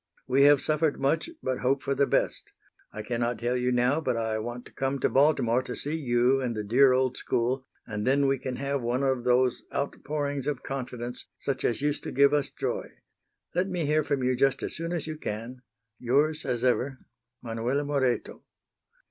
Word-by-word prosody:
We 135 +2 +4
have 145 -1 +6
suffered 155 -1 +1
much, 140 - +1
but 130 -1 -1
hope 135 +2 +1
for 140 - 0
the 140 0 +2
best. - - 0 0.4
I 105 - -6
cannot 120 0 -1
tell 120 +2 -1
you 125 0 +1
now, 125 +5 +2
but 125 -6 -1
I 110 -1 -1
want 120 +2 -6
to - - -13
come 135 +1 -1
to 130 - +1
Baltimore 135 -4 +3
to 125 -1 -6
see 150 +3 -3
you 130 -2 +2
and 120 -3 -2
the 105 - -3
dear 130 +6 +5
old 130 0 +1
school, 130 +2 -1 0.2
and 105 0 -4
then 140 +1 +3
we 135 -1 +1
can 130 -1 -4
have 140 0 -2
one 120 +3 0
of 130 -3 0
those 125 0 +3
outpourings 145 -1 -3
of 145 -3 -2
confidence 125 -2 -5
such 140 - -2
as 120 +4 0
used 150 0 0
to - - -4
give 140 +2 +4
us 145 -2 +1
joy. - - -3 0.6
Let 180 +3 0
me 175 -4 -1
hear 155 +1 +2
from 140 -2 -1
you 130 0 +2
just 135 +1 +2
as - - -3
soon 165 +1 -4
as 170 -4 +1
you 155 -1 -5
can. 120 0 -6 0.4
Yours 150 +6 +1
as 120 -2 -1
ever, 130 +1 +1 0.5
MANUELA 120 +4 -1
MORETO. 140 -4 -1
130 Hz, 200 wpm, -27 LUFS, 125-140 Hz, 0.6 s, have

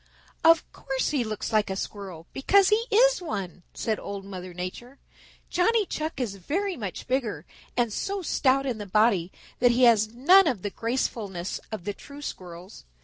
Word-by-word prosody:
"Of 330 -1 +6
course 270 -1 -2
he 280 -5 +1
looks 215 0 -4
like 215 -2 +3
a 190 - -2
Squirrel, 190 -5 -6
because 385 +8 +4
he 440 +2 +2
is - - +4
one," 195 - -5
said 220 -2 -1
Old 200 -1 -6
Mother 185 -2 -7
Nature. 185 +9 -7 0.5
"Johnny 425 +4 +3
Chuck 310 -4 -4
is 215 -6 -3
very 365 - -2
much 205 - -6
bigger 235 - -1 0.3
and 235 -3 +1
so 395 - -3
stout 275 -3 +2
in 245 -5 -2
the 205 - -6
body 195 -3 +2 0.3
that 245 - +5
he 240 +2 +3
has 220 -3 +5
none 340 +11 +6
of 230 -11 -1
the 205 - -2
gracefulness 215 -6 -3
of 215 -5 -5
the 205 - -3
true 285 +7 -12
Squirrels. 180 - -8
235 Hz, 175 wpm, -26 LUFS, 195-290 Hz, 0.5 s, Of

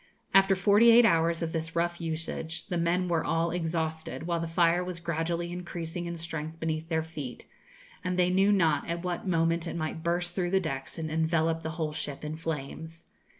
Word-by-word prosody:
After 195 0 +6
forty 205 +4 +5
eight 235 +1 +8
hours 165 -3 +3
of 165 - -2
this 160 0 -4
rough 175 +1 0
usage 160 0 -3
the 175 - -2
men 175 +2 +1
were 170 -2 +1
all 165 +1 +1
exhausted, 160 -2 -2
while 170 -1 0
the 165 - -2
fire 170 +1 +3
was 180 -1 -5
gradually 170 +1 -2
increasing 175 -1 -5
in 170 0 -4
strength 160 -1 -5
beneath 160 0 -2
their 160 -1 +1
feet, 150 -6 -7 0.6
and 180 0 -1
they 180 0 +3
knew 195 +2 +4
not 165 -7 +2
at 170 +1 -2
what 180 +1 -3
moment 165 -1 +1
it - - -4
might 160 -1 -3
burst 175 +1 -1
through 180 -1 -1
the 190 +1 +3
decks 135 -7 -4
and 160 -1 -3
envelope 160 0 +1
the 160 - -4
whole 155 -2 -1
ship 145 -1 -3
in 150 +1 -3
flames. 160 +1 -5
165 Hz, 195 wpm, -29 LUFS, 160-175 Hz, 0.6 s, eight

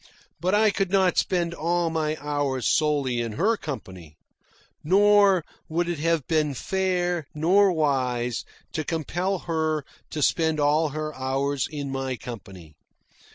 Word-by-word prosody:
But 185 +3 +1
I 215 0 +4
could 195 -2 -1
not 190 -2 +3
spend 175 -2 0
all 170 0 0
my 155 -1 -1
hours 145 -4 -2
solely 140 -6 +1
in 115 -2 -3
her 205 - +2
company. 95 - -8 0.7
Nor 200 0 +5 0.2
would 170 +2 0
it 170 -3 -2
have 165 -3 +1
been 155 -3 +1
fair, 180 -1 -1
nor 185 +6 +4
wise, 130 -7 0 0.3
to 155 - -1
compel 175 +5 -2
her 160 -3 -1 0.2
to 150 - -2
spend 160 0 +2
all 150 +2 +3
her 155 +1 -4
hours 135 +1 -1
in 145 -3 -4
my 135 -1 -2
company. 95 - -10
155 Hz, 140 wpm, -25 LUFS, 135-175 Hz, 0.7 s, Nor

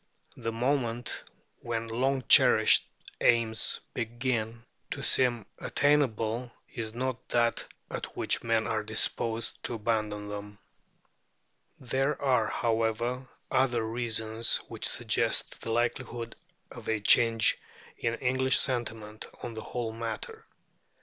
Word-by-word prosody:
The 115 -2 -3
moment 120 0 -1 0.3
when 115 -1 -3
long 130 +3 0
cherished - - +7 0.3
aims 115 -1 +2
begin 115 -1 -2 0.2
to - - -5
seem 120 -5 +2
attainable 125 -5 +1 0.2
is 115 -2 -5
not 130 0 -3
that 120 -1 +1 0.2
at - - -6
which - - +1
men - - +1
are - - 0
disposed 115 0 -1
to 120 - 0
abandon 105 -2 -1
them. 105 0 -7 1.2
There 135 +3 -1
are, 135 -3 +2
however, 115 +2 -1 0.2
other 120 -3 +2
reasons 115 -1 +1
which - - -1
suggest - - 0
the - - -5
likelihood 120 0 -2 0.4
of - - -8
a 110 -1 +1
change 115 +1 +5 0.4
in 115 0 -1
English 130 +1 +1
sentiment 110 -4 -2 0.2
on 120 - -5
the 110 - -6
whole 115 -1 -4
matter. 115 -1 -5
115 Hz, 115 wpm, -29 LUFS, 110-125 Hz, 1.2 s, cherished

